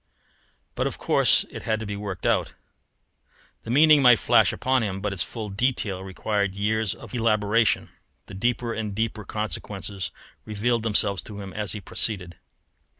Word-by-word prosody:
But - - -1
of - - -5
course - - +3
it - - -7
had 110 -1 -1
to 110 - -5
be 100 0 -4
worked 100 -2 -6
out. - - +1 1.1
The - - -10
meaning 150 +3 +6
might 125 -3 +7
flash - - +4
upon 130 -1 +1
him, 100 -3 -2
but 100 0 -2
its 95 - -4
full 105 +5 -4
detail 100 -4 -1
required 100 +1 -2
years 105 0 0
of - - -12
elaboration; 110 -1 +2 0.4
and 95 -1 -9
deeper 120 +1 0
and 105 -3 -4
deeper 110 0 -2
consequences 105 -2 -4 0.3
revealed 115 +3 0
themselves 105 -4 +2
to 105 +3 -9
him 95 -2 -8
as 105 -4 -1
he 105 - -6
proceeded. 90 -5 -2
105 Hz, 160 wpm, -25 LUFS, 100-115 Hz, 1.1 s, might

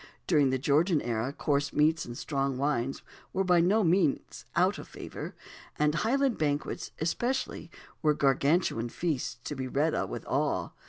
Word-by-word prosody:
During 150 -6 +4
the 130 - +1
Georgian 155 +4 +3
era 120 +1 -2
coarse 140 -1 0
meats 155 +2 +2
and 120 0 -7
strong 135 -3 -1
wines 135 -2 -1 0.3
were 195 - +1
by 180 -2 +4
no 205 +6 +3
means 170 -4 +1
out - - +2
of - - -9
favour; - - -8 0.4
and 150 0 +2
Highland 255 - +1
banquets 145 -1 -1
especially 240 +1 -2 0.3
were 150 -1 +3
Gargantuan 140 -3 +2
feasts, 150 -4 -2
to - - -4
be 130 -1 -3
read 145 +5 +1
of - - -1
with - - -6
awe. - - 0
150 Hz, 160 wpm, -29 LUFS, 135-175 Hz, 0.4 s, During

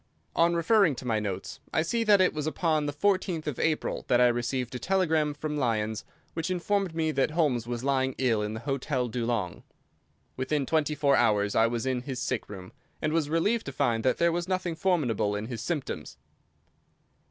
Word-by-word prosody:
On 170 +1 +3
referring 170 -2 +4
to 125 - -8
my 115 -3 +1
notes 100 -3 -5
I 160 - +2
see 230 +8 0
that 205 -2 +6
it 185 - +4
was 150 0 -3
upon 155 -2 0
the - - -1
14th 185 0 0
of 150 -5 -3
April 160 -2 0
that 120 - +3
I 125 0 +6
received 120 +1 -2
a 125 - -4
telegram 160 -3 +1
from 150 0 -3
Lyons 110 -5 -1 0.3
which 165 +1 -3
informed 185 0 0
me 160 -1 +1
that 135 -2 +1
Holmes 145 -8 +1
was 120 0 -4
lying 130 -1 +1
ill 120 -5 +2
in 105 +1 -3
the 110 - -6
Hotel 135 -1 -1
Dulong. 115 -7 -2 0.7
Within 135 +2 -1
twenty 155 +1 +1
four 140 -1 +3
hours 105 -3 +2
I 115 - +5
was 115 +1 -2
in 130 -2 0
his 130 -1 -5
sick 125 -2 -2
room, 95 -3 -9 0.3
and 155 0 -1
was 160 -3 +1
relieved 200 +8 +1
to - - -3
find 115 -3 0
that 130 - +2
there 170 0 +3
was 175 +1 -2
nothing 185 -2 -1
formidable 125 - +1
in 105 +1 -3
his 115 -1 -5
symptoms. 150 +1 -4
140 Hz, 200 wpm, -28 LUFS, 120-165 Hz, 0.7 s, that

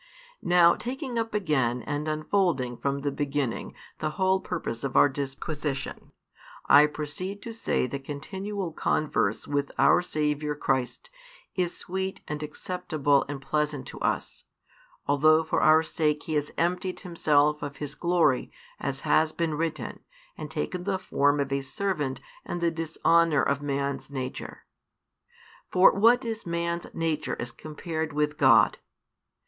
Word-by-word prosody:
Now 175 -1 +6
taking 255 -1 -4
up 225 -1 -3
again 135 - +1
and 150 +1 -3
unfolding 155 -5 0
from 140 +2 -2
the 145 0 -1
beginning 140 -3 -2 0.2
the 155 - -1
whole 190 0 +3
purpose 160 -11 -4
of 140 - -3
our - - +8
disquisition, 140 +1 -4 0.5
I 145 +1 +7
proceed 160 +7 -5
to 230 - -6
say 225 - 0
that 135 +1 -5
continual 190 +6 -5
converse 150 -9 0
with 145 -1 -1
our - - +5
Saviour 150 -3 -1
Christ 130 - -2 0.4
is 180 -2 -1
sweet 190 +1 -4
and 150 0 -4
acceptable 150 -3 0
and 145 -1 -4
pleasant 145 0 -1
to - - -9
us, - - -2 0.6
although 155 +3 +4
for 160 - 0
our 155 +1 +6
sake 150 -2 0
He 160 - -4
has 150 -1 0
emptied 180 +2 -1
Himself 150 -4 +2
of 145 -1 -5
His 145 -1 -5
glory, 170 -5 +2 0.3
as 135 -1 -3
has 155 0 +3
been 165 -1 -1
written, 160 +1 -3 0.4
and - - -7
taken 180 -1 -3
the 195 0 0
form 145 -5 +1
of 140 -1 -1
a 140 0 0
servant 150 -2 -2 0.2
and 175 - -4
the 170 -1 +1
dishonour 165 -2 +2
of 140 +1 0
man's 140 -1 -2
nature. 130 -2 -6 1.0
For 180 +1 +6
what 235 +5 +4
is 225 -1 -3
man's 170 0 -2
nature 160 -2 -1
as 120 - -3
compared 155 +3 -5
with 150 0 0
God! 115 -6 +5
155 Hz, 145 wpm, -27 LUFS, 140-175 Hz, 1.0 s, our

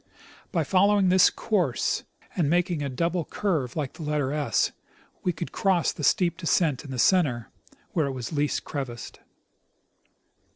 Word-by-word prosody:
By 170 -5 +1
following 195 +3 +3
this 185 0 +6
course, 175 - -1 0.3
and 160 -5 +1
making 175 -1 +1
a 140 - -2
double 170 +6 -1
curve 155 -10 -2
like 145 -4 -3
the - - -11
letter 150 -3 -1
$, 145 0 +1 0.5
we 180 - +1
could 170 0 -6
cross 190 -4 +1
the 150 - -7
steep 170 +5 +2
descent 160 -6 +1
in 145 - -11
the 130 - -5
center, 130 -6 +2 0.4
where 160 -5 +1
it - - -2
was 125 +2 -6
least 145 0 0
crevassed. 125 -5 -6
155 Hz, 155 wpm, -26 LUFS, 140-180 Hz, 0.5 s, this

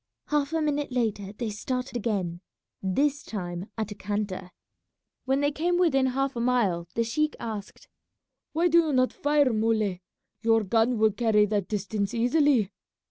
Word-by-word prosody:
Half 295 -1 +1
a 320 -1 +1
minute 290 -2 -1
later 215 -5 -1
they 215 +1 -4
started 250 +4 -4
again, 195 -7 -2 0.4
this 280 +10 +1
time 180 -2 -5
at 220 -1 -3
a - - -2
canter. 200 -2 -3 0.8
When 270 +2 +1
they 290 0 +2
came 345 +4 0
within 270 -7 +3
half 270 +1 -1
a - - -3
mile 210 -9 +1
the 230 - +2
sheik 305 +7 0
asked, 215 -3 -7 0.6
"Why 335 +3 +2
do 340 0 +5
you 315 -3 +1
not 255 -1 +2
fire, 290 -3 +2
Muley; 215 -4 +1 0.4
your 225 -1 +3
gun 225 +4 +2
will 220 0 +4
carry 210 -1 +3
that 205 -2 -1
distance 205 0 -2
easily?" 245 -3 +3
230 Hz, 160 wpm, -27 LUFS, 205-275 Hz, 0.8 s, do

